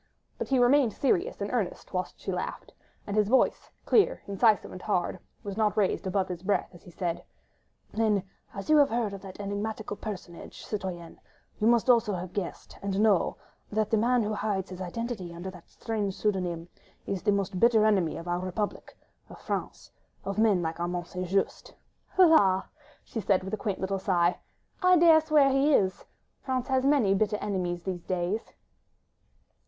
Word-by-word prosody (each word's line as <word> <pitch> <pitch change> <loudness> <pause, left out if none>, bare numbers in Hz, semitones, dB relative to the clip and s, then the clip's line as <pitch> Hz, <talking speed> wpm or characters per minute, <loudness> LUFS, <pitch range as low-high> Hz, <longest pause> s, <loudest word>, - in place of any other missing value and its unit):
But - - -3
he 270 - +2
remained 245 -2 +4
serious 370 - 0
and - - -3
earnest - - -3
whilst - - -3
she - - -4
laughed, - - -5 0.3
and 200 - -4
his 210 -1 +3
voice, 260 - +2 0.2
clear, 420 - +3
incisive, 210 +2 +2
and 185 - -9
hard, 185 -3 -1 0.2
was 200 0 -6
not 215 -1 +1
raised 195 -1 +1
above 190 0 0
his 180 -2 -6
breath 200 +2 0
as 175 - -14
he - - -14
said,— 175 -1 -3 0.7
"Then, 215 -3 +1 0.3
as 195 - -7
you 310 - +5
have 285 -1 +5
heard 225 -3 -1
of 195 - -7
that 195 -1 -10
enigmatical 205 +1 -4
personage, 190 -5 -8
citoyenne, 180 -5 -5 0.4
you 215 - +2
must 235 0 +4
also 230 -5 +4
have 180 0 -6
guessed, 195 -4 -5
and 200 0 -2
known, 210 -4 +3 0.4
that 215 0 0
the 225 - +4
man 240 +2 +3
who 210 +1 -2
hides 200 -3 -2
his 185 0 -7
identity 185 -2 -5
under 180 +2 -6
that 180 -3 -15
strange 210 -4 -3
pseudonym, 180 -5 -1 0.4
is 195 -2 -3
the 205 - +2
most 195 -2 -1
bitter 225 -1 +5
enemy 190 -7 +2
of 170 - -8
our 175 0 0
republic, 185 +3 -4 0.3
of - - -11
France... - - -5 0.3
of 195 +1 -2
men 210 -5 +3
like 160 +1 -3
Armand 175 0 -2
St. 180 +1 -5
Just." 195 +2 -1 0.4
"La!.. 205 - +6 0.2
." - - -28
she 225 - -4
said, 195 -2 +2
with 190 - -7
a - - +3
quaint 205 -2 -3
little 190 0 -2
sigh, 180 -2 +1 0.4
"I 365 -1 +6
dare 325 -1 +7
swear 300 -3 +4
he 275 +2 +4
is.... 190 -1 0 0.4
France 260 -1 -2
has 265 0 +2
many 265 -9 +4
bitter 210 +1 +1
enemies 180 -4 -2
these 185 -2 -4
days." 185 +4 -2
200 Hz, 180 wpm, -28 LUFS, 185-225 Hz, 0.7 s, dare